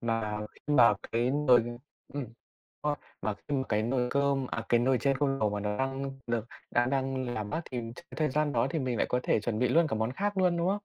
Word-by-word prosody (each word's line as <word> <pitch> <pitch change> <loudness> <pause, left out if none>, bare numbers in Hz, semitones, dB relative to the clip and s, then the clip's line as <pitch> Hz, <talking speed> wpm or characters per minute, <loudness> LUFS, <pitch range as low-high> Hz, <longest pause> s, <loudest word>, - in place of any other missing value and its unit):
mà 115 -2 -1
khi 150 - -5
mà 115 -5 +7 0.2
cái 120 +2 +2
nồi, 135 -4 +5 0.5
ừm 145 -2 -2 0.6
a, 150 -1 0 0.3
và 105 +2 -1
khi 140 +8 -4
mà 130 - +1
cái 105 +1 +2
nồi 125 +1 +1
cơm 140 -1 +1
à, - - -4
cái 120 - +5
nồi 130 +1 +3
chiên 135 +2 +1
không 135 -1 +1
dầu 105 -1 +2
mà 105 0 -2
nó 105 0 -2
đang 135 +1 -2 0.2
được 115 -2 -1 0.3
đã 120 0 +3
đang 130 -2 -1
làm 105 -2 -3
mát 160 - -2
thì 125 -2 -2
ch - - -10 0.2
thời 155 -1 +2
gian 150 +2 +1
đó - - +2
thì 165 - -1
mình 130 -4 -1
lại - - +2
có 125 - +2
thể - - +2
chuẩn 110 0 -2
bị 125 - +3
luôn 165 -1 +4
cả 125 - -2
món 110 +3 0
khác 200 +6 -2
luôn, 180 -2 +3
đúng 170 - 0
không? 190 - +3
130 Hz, 255 wpm, -30 LUFS, 115-140 Hz, 0.6 s, mà